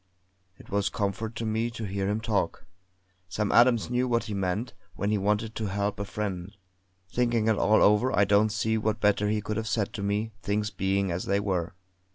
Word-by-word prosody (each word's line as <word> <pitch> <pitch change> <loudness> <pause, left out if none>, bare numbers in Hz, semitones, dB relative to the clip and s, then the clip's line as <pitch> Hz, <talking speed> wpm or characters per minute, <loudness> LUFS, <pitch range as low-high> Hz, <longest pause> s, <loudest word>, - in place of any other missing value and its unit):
It - - -16
was 100 0 +1
comfort 110 0 -3
to 115 - -3
me 110 +2 0
to 115 -1 -7
hear 100 -1 -2
him 105 +2 -1
talk. 105 -9 -1 0.6
Sam 105 +2 -1
Adams 120 -1 +4
knew 125 +1 +1
what 115 -2 +1
he 110 -2 -5
meant, 100 +4 -2 0.2
when 100 +4 -1
he 105 - +1
wanted 105 +3 0
to 110 -2 -3
help 100 +1 -2
a 100 - -2
friend; 100 -2 -5 0.5
thinking 120 -2 +1
it 110 - +4
all 105 +2 +4
over 105 +5 +4
I 100 - +3
don't 105 +2 +4
see 110 +1 0
what 110 0 -1
better 105 0 +2
he 105 0 0
could 105 0 -3
have 110 0 -3
said 105 -2 -1
to 105 - -5
me 105 +2 -1
things 105 +1 -1
being 95 0 0
as 85 +2 -3
they 100 +1 +1
were. 95 -3 -2
105 Hz, 210 wpm, -27 LUFS, 100-110 Hz, 0.6 s, Adams